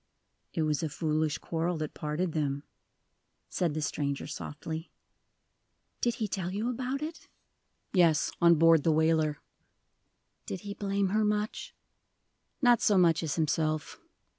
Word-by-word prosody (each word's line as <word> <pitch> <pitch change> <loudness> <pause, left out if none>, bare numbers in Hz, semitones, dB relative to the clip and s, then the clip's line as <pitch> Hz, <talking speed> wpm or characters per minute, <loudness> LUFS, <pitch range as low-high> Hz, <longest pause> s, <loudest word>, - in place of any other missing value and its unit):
"It 160 - +1
was 150 -2 0
a 160 - -1
foolish 155 0 0
quarrel 165 +1 -2
that 155 -1 -4
parted 155 +4 -2
them," 145 -2 -1 0.9
said 170 -4 -1
the 155 - -1
stranger, 140 -2 -2
softly. 160 +2 -6 1.1
"Did 240 -1 +1
he 220 - -2
tell 185 -2 -3
you 215 +5 -1
about 260 +4 -3
it?" 320 +1 -7 0.7
"Yes, 170 -5 +4
on 170 0 +7
board 165 0 +6
the 165 - +3
whaler." 155 -1 +2 1.1
"Did 185 - -4
he 205 0 -6
blame 200 -1 0
her 215 +2 +2
much?" 210 0 -2 0.9
"Not 240 -2 +5
so 205 - +4
much 170 -3 +4
as 155 -3 -2
himself. 155 -1 -1
165 Hz, 140 wpm, -30 LUFS, 155-200 Hz, 1.1 s, on